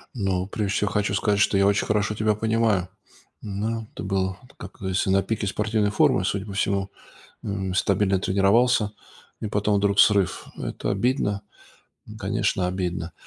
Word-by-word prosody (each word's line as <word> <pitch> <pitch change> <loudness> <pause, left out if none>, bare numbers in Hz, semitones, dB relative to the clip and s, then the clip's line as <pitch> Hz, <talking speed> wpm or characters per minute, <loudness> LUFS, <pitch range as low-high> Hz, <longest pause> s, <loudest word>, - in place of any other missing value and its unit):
Ну, 95 -4 -1
прежде 100 -1 -2
всего, 105 0 +1
хочу 105 -1 0
сказать, 105 0 +1
что 105 -1 +3
я 100 - +4
очень 100 0 +2
хорошо 105 0 0
тебя 110 0 +1
понимаю. 110 -4 +1 0.5
Ну, 110 +2 -3
это - - -7
было, 95 -1 -1 0.2
как - - -10
говорится, 95 0 0
на 95 0 +4
пике 110 -2 -2
спортивной 105 +1 0
формы, 130 - +3
судя 100 +1 -1
по 100 - -7
всему. 100 -1 0 0.5
М, 95 -2 -3
стабильно 95 0 +2
тренировался 105 +3 +3 0.5
и 110 - -3
потом 105 0 +1
вдруг 100 0 +3
срыв. 100 -4 +3
Это - - -4
обидно, 105 -1 0 0.8
конечно, 90 -1 0
обидно. 90 -2 -3
100 Hz, 155 wpm, -24 LUFS, 95-105 Hz, 0.8 s, я